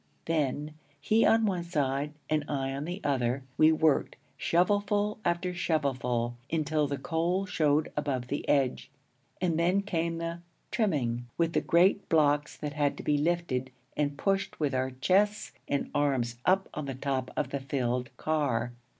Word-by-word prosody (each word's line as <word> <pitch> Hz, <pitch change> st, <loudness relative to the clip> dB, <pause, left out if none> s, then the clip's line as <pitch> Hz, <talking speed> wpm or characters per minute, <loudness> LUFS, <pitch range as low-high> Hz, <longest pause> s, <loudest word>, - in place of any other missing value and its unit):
Then, 150 Hz, -1 st, -1 dB, 0.3 s
he 215 Hz, +10 st, +3 dB
on 225 Hz, 0 st, +4 dB
one 185 Hz, -4 st, 0 dB
side 145 Hz, -3 st, -1 dB
and 155 Hz, -1 st, +1 dB
I 135 Hz, -2 st, -1 dB
on 140 Hz, +2 st, -4 dB
the 180 Hz, +4 st, -5 dB
other, 135 Hz, -2 st, 0 dB
we 155 Hz, 0 st, +6 dB
worked, 160 Hz, -2 st, +2 dB, 0.2 s
shovelful 205 Hz, +4 st, +1 dB
after 175 Hz, +1 st, 0 dB
shovelful, 125 Hz, -8 st, 0 dB, 0.2 s
until 155 Hz, -2 st, +1 dB
the 140 Hz, 0 st, -2 dB
coal 175 Hz, +5 st, 0 dB
showed 155 Hz, -4 st, +1 dB
above 140 Hz, -4 st, -1 dB
the 140 Hz, +3 st, -4 dB
edge. 135 Hz, -3 st, +1 dB, 0.5 s
And 170 Hz, -3 st, +1 dB
then 180 Hz, +4 st, +3 dB
came 170 Hz, -3 st, -1 dB
the 165 Hz, 0 st, -4 dB, 0.3 s
'trimming' 125 Hz, -, 0 dB
with 165 Hz, -1 st, +1 dB
the -, -, +2 dB
great 185 Hz, +4 st, +3 dB
blocks 145 Hz, -2 st, +2 dB
that 150 Hz, -1 st, -4 dB
had 145 Hz, -1 st, 0 dB
to -, -, -7 dB
be 145 Hz, -1 st, +2 dB
lifted 150 Hz, -5 st, 0 dB, 0.3 s
and 145 Hz, -1 st, -1 dB
pushed 195 Hz, +2 st, -1 dB
with 145 Hz, -3 st, 0 dB
our 130 Hz, 0 st, 0 dB
chests 190 Hz, +11 st, +1 dB, 0.2 s
and 140 Hz, -, -1 dB
arms 130 Hz, -5 st, 0 dB
up 190 Hz, +1 st, +3 dB
on 150 Hz, -, -4 dB
the 135 Hz, -, -4 dB
top 130 Hz, -1 st, -2 dB
of 135 Hz, -, -1 dB
the 140 Hz, -, -1 dB
filled 125 Hz, -3 st, -1 dB
car. 130 Hz, -7 st, 0 dB
150 Hz, 160 wpm, -29 LUFS, 135-175 Hz, 0.5 s, we